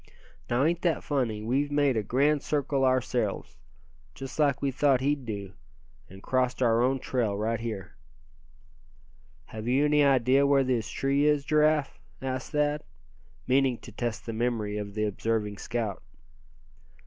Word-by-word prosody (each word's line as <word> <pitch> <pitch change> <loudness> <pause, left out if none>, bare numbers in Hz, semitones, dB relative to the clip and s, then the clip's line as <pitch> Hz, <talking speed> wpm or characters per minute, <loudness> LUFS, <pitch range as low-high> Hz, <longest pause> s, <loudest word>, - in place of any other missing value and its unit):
Now, 120 +3 +2
ain't 170 +2 +1
that 170 -4 0
funny, 120 -8 -1
we've 135 +6 0
made 145 -3 +2
a 110 - +1
grand 140 +7 +2
circle 140 -2 -1
ourselves, 125 -4 0 0.6
just 135 +2 -8
like 145 -3 +3
we 140 -1 0
thought 135 0 +3
he'd 140 0 -1
do; 100 -3 -5 0.6
and 95 +1 -13
crossed 130 -1 0
our 115 -2 +3
own 130 +2 +2
trail 120 -6 -1
right 110 +2 -1
here." 110 -5 -5 1.5
"Have 110 +5 -8
you 135 +4 +3
any 150 0 +4
idea 135 0 +4
where 140 -1 +4
this 120 -4 -1
tree 140 +1 +1
is, 150 -2 +2
Giraffe?" 150 -1 +2 0.2
asked 130 -1 -4
Thad, 150 -1 0 0.6
meaning 130 -1 +2
to 115 - -12
test 115 0 -4
the 115 - -4
memory 110 -3 -1
of 100 -1 -6
the 105 0 0
observing 105 0 -2
scout. 115 -5 -3
130 Hz, 150 wpm, -28 LUFS, 115-140 Hz, 1.5 s, any